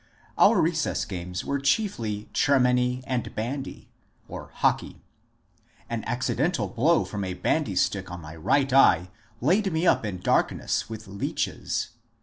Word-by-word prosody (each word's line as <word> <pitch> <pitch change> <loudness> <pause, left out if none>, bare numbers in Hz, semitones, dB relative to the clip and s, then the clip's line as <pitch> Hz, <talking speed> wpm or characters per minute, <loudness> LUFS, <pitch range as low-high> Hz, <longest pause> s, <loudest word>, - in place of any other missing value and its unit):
Our - - +5
recess - - 0
games 90 0 -5
were 140 - -1
chiefly 135 - -1
chermany 125 -2 +2
and 125 -4 -3
bandy 130 +5 -5 0.4
(" - - -33 0.3
hockey - - 0 0.5
"). - - -34
An 115 -2 -2
accidental 140 +7 0
blow 150 +8 +2
from 105 -1 -4
a 95 -1 -3
bandystick 95 - 0
on 90 0 -7
my 80 -1 -10
right 135 - +1
eye 95 -9 +5 0.3
laid 190 - +2
me 160 +2 0
up - - +4
in 100 -4 -3
dark 90 - +2
ness, - - -2
with 110 -1 -8
leeches. 100 +1 -3
120 Hz, 140 wpm, -26 LUFS, 95-140 Hz, 0.5 s, Our